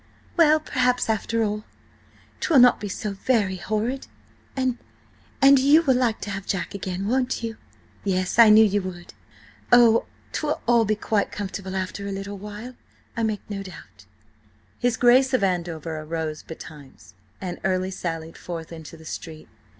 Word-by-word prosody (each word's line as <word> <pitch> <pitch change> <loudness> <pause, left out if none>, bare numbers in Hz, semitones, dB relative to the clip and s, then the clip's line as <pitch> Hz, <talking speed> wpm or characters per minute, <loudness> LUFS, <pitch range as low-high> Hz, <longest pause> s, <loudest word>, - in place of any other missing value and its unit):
Well, 310 -3 +5
perhaps 250 -5 +1
after 225 +1 0
all, 210 0 -2 0.8
'twill 335 -6 +2
not 245 -1 +7
be 205 - -5
so 205 +2 -4
very 200 -2 0
horrid. 220 +8 -2 0.5
And–and 265 +1 +1
you 290 +5 +5
will 270 -5 +4
like 245 -3 +1
to 205 - -4
have 200 -1 -6
Jack 190 0 -2
again, 195 0 -4
won't 255 +1 0
you? 225 -1 -4 0.5
Yes–I 195 +4 +4
knew 215 +1 +8
you 205 0 +1
would. 180 -2 -8 0.6
Oh, 235 -2 +6 0.3
'twill 300 -1 -1
all 235 -1 +4
be 215 +1 +1
quite 210 0 -1
comfortable 195 -1 -5
after 190 +1 -4
a - - -3
little 195 +1 -6
while, 210 +5 -8 0.4
I 230 - -2
make 215 -2 -2
no 200 -2 -5
doubt!" 100 - -12 0.7
His 245 -2 +1
Grace 255 +2 +5
of 245 - 0
Andover 170 -4 -2
arose 155 0 -4
betimes, 150 -4 -12 0.3
and 180 -2 -5
early 185 0 0
sallied 165 -3 -5
forth 165 -2 -7
into 165 0 -10
the 160 - -15
street. 155 0 -8
205 Hz, 155 wpm, -24 LUFS, 185-240 Hz, 0.8 s, knew